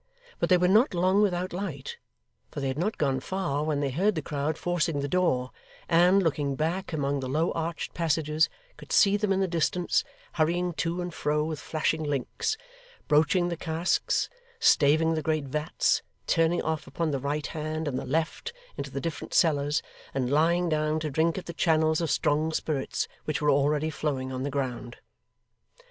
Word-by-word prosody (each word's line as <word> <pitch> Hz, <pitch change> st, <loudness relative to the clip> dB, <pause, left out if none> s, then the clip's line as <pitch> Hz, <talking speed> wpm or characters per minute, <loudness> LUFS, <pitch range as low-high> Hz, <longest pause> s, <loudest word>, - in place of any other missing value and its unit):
But -, -, 0 dB
they 180 Hz, -, +6 dB
were 180 Hz, 0 st, +3 dB
not 210 Hz, +2 st, +4 dB
long 185 Hz, +3 st, +3 dB
without 185 Hz, -3 st, 0 dB
light, 175 Hz, -8 st, -5 dB, 0.5 s
for -, -, -6 dB
they 135 Hz, -1 st, -1 dB
had 130 Hz, -, -3 dB
not 210 Hz, +6 st, -1 dB
gone 135 Hz, -3 st, +1 dB
far 150 Hz, -3 st, -2 dB
when 150 Hz, -2 st, 0 dB
they 140 Hz, -2 st, 0 dB
heard 195 Hz, +9 st, +1 dB
the 155 Hz, -, -3 dB
crowd 145 Hz, +2 st, -2 dB
forcing 165 Hz, -4 st, 0 dB
the 140 Hz, -, -2 dB
door; 140 Hz, -7 st, +1 dB, 0.4 s
and, 180 Hz, +3 st, +5 dB
looking 145 Hz, -4 st, 0 dB
back 170 Hz, +7 st, -2 dB
among 140 Hz, -3 st, -1 dB
the 130 Hz, -1 st, -4 dB
low 155 Hz, +5 st, +1 dB
arched 165 Hz, 0 st, -3 dB
passages, 160 Hz, -2 st, +1 dB, 0.3 s
could -, -, -12 dB
see 200 Hz, 0 st, +5 dB
them 205 Hz, -1 st, 0 dB
in 195 Hz, 0 st, +2 dB
the 190 Hz, -, +2 dB
distance, 175 Hz, +1 st, +1 dB, 0.3 s
hurrying 175 Hz, +2 st, +1 dB
to 170 Hz, +2 st, -2 dB
and 175 Hz, -1 st, -5 dB
fro 150 Hz, 0 st, 0 dB
with 155 Hz, -1 st, -3 dB
flashing 155 Hz, +1 st, -1 dB
links, 145 Hz, -, -2 dB, 0.5 s
broaching 160 Hz, +4 st, +3 dB
the 170 Hz, -, -2 dB
casks, 165 Hz, +2 st, 0 dB, 0.3 s
staving 160 Hz, +2 st, +4 dB
the 160 Hz, -, -1 dB
great 155 Hz, -1 st, 0 dB
vats, 150 Hz, +3 st, 0 dB, 0.2 s
turning 165 Hz, +1 st, +2 dB
off 160 Hz, -1 st, -2 dB
upon 165 Hz, -2 st, -2 dB
the 140 Hz, -, -1 dB
right 145 Hz, +3 st, -2 dB
hand 155 Hz, 0 st, -3 dB
and 130 Hz, -3 st, -1 dB
the -, -, -5 dB
left, 160 Hz, -, -2 dB, 0.2 s
into 140 Hz, -, -4 dB
the 140 Hz, +1 st, -4 dB
different 165 Hz, -2 st, -4 dB
cellars, 145 Hz, -3 st, +2 dB, 0.3 s
and 130 Hz, -1 st, 0 dB
lying 170 Hz, +4 st, +3 dB
down 155 Hz, -1 st, +1 dB
to 155 Hz, -1 st, -3 dB
drink 160 Hz, +4 st, +1 dB
at 190 Hz, -, -5 dB
the 170 Hz, -, -6 dB
channels 160 Hz, -1 st, +2 dB
of 165 Hz, -, -1 dB
strong 155 Hz, +2 st, +1 dB
spirits 150 Hz, -3 st, -2 dB, 0.2 s
which 155 Hz, -, -1 dB
were 150 Hz, -1 st, +3 dB
already 145 Hz, +3 st, +2 dB
flowing 135 Hz, -4 st, -2 dB
on 130 Hz, 0 st, -4 dB
the 140 Hz, -, -2 dB
ground. 125 Hz, -3 st, -4 dB
155 Hz, 185 wpm, -27 LUFS, 145-175 Hz, 0.5 s, they